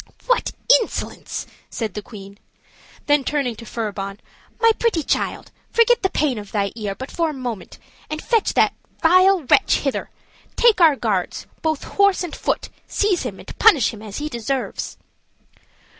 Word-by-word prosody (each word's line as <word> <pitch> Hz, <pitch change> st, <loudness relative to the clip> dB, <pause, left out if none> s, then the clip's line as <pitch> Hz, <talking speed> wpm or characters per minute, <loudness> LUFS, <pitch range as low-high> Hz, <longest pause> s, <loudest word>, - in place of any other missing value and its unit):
"What -, -, +1 dB, 0.3 s
insolence!" 450 Hz, -, -5 dB, 0.2 s
said 220 Hz, -5 st, -4 dB
the 210 Hz, -, -5 dB
queen: 200 Hz, -1 st, -12 dB, 0.7 s
then 290 Hz, -1 st, +3 dB
turning 275 Hz, -4 st, -1 dB
to 230 Hz, -, -11 dB
Furibon, 200 Hz, -3 st, -4 dB, 0.4 s
"my 455 Hz, 0 st, +6 dB
pretty 440 Hz, -9 st, +1 dB
child, -, -, -2 dB, 0.2 s
forget 465 Hz, +1 st, +4 dB
the 380 Hz, -, +1 dB
pain 280 Hz, -10 st, 0 dB
of 205 Hz, -1 st, -10 dB
thy 200 Hz, -2 st, 0 dB
ear 210 Hz, -4 st, -4 dB
but 260 Hz, +5 st, -8 dB
for 335 Hz, -2 st, 0 dB
a -, -, -4 dB
moment, 245 Hz, -8 st, -6 dB, 0.3 s
and 310 Hz, 0 st, -3 dB
fetch 455 Hz, +5 st, +1 dB
that -, -, +4 dB, 0.3 s
vile 370 Hz, +1 st, +5 dB
wretch 255 Hz, -, +3 dB
hither; 275 Hz, -2 st, -2 dB, 0.5 s
take 455 Hz, -6 st, +4 dB
our 320 Hz, -4 st, +7 dB
guards, 210 Hz, -8 st, -2 dB, 0.2 s
both 315 Hz, -2 st, -1 dB
horse 400 Hz, -2 st, +2 dB
and 350 Hz, -, -5 dB
foot, -, -, -2 dB, 0.2 s
seize 405 Hz, -4 st, +1 dB
him, 220 Hz, -7 st, -5 dB
and -, -, -11 dB
punish 305 Hz, -, +5 dB
him 215 Hz, -, -10 dB
as 210 Hz, -2 st, -7 dB
he 295 Hz, -, -3 dB
deserves." 260 Hz, 0 st, -3 dB
275 Hz, 160 wpm, -21 LUFS, -, 0.7 s, our